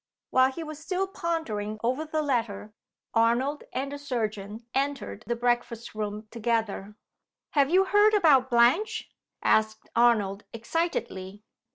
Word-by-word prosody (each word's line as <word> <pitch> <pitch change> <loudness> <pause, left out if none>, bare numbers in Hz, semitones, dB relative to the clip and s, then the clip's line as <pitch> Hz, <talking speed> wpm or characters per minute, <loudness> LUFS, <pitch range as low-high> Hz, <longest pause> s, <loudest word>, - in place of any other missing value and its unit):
While 260 +1 +5
he 325 +5 -6
was 310 -1 -8
still 365 +4 -1
pondering 320 - -3
over 255 +7 0
the 310 0 -1
letter, 225 -6 -2 0.4
Arnold 240 +6 +2
and 275 +2 -3
the 285 - -6
surgeon 220 -5 -4
entered 275 -5 -2
the 235 - 0
breakfast 240 -1 -1
room 210 0 -4
together. 220 -3 -2 0.6
"Have 280 -2 +3
you 375 +3 +4
heard 415 +2 +5
about 285 -10 +5
Blanche?" 265 - +3 0.3
asked 220 0 +1
Arnold, 215 -4 +3
excitedly. 220 - -3
240 Hz, 130 wpm, -27 LUFS, 220-305 Hz, 0.6 s, While